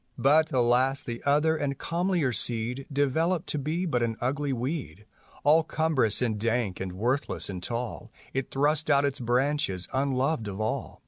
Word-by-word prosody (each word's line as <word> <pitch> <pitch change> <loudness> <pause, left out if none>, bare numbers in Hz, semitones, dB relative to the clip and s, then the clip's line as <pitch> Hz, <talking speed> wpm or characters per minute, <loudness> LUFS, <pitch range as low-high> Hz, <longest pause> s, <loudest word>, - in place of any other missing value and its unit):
But, 155 +4 +4
alas, 130 +2 +2
the 120 -1 -6
other 150 +3 +3
and 145 -3 -2
comlier 170 -6 0
seed 120 +3 0
Developed 160 +5 +1
to 150 - -1
be 160 +6 -2
but 125 -8 0
an 115 -1 -1
ugly 140 +3 -1
weedj 125 - -4 0.4
All 155 +3 +5
cumbrous 155 -9 +1
and 110 -4 -1
dank 115 -4 -1
and 95 -1 -4
worthless 120 +3 -1
and 90 -2 -6
tall,. 120 +3 -4 0.2
It 135 0 -2
thrust 150 +3 +1
out 140 -1 +4
its 140 -1 -1
branches 125 -5 0
unloved 135 -2 0
of 100 0 -6
all. 110 0 -3
135 Hz, 160 wpm, -27 LUFS, 120-150 Hz, 0.4 s, All